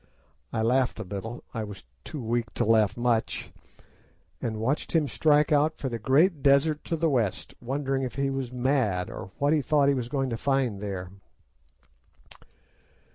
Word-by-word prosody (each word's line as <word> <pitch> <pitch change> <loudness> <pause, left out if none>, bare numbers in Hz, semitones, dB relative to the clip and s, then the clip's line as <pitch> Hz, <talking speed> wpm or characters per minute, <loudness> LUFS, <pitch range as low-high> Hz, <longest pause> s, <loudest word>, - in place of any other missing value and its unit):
I 110 -1 -1
laughed 125 +2 +2
a - - -3
little—I 110 +3 -6
was 105 -6 -9 0.2
too 150 - -7
weak 115 -1 -1
to - - +1
laugh 110 -1 +3
much—and 115 -1 -4
watched 130 +7 -1
him 155 -3 +3
strike 150 +3 +3
out 150 +2 +3
for 135 - -3
the 115 -1 -4
great 145 - +3
desert 145 +2 +3
to 165 - -1
the 165 +1 +1
west, 120 - -1
wondering 135 +2 -1
if 130 -2 -4
he 140 0 0
was 135 -2 -3
mad, 125 -8 0
or - - -7
what 145 +2 +2
he 155 - +3
thought 140 0 +3
he - - +4
was 125 -3 -3
going 135 -2 -1
to 115 - -2
find 130 -6 0
there. 95 -3 -5
130 Hz, 165 wpm, -27 LUFS, 115-140 Hz, 0.2 s, he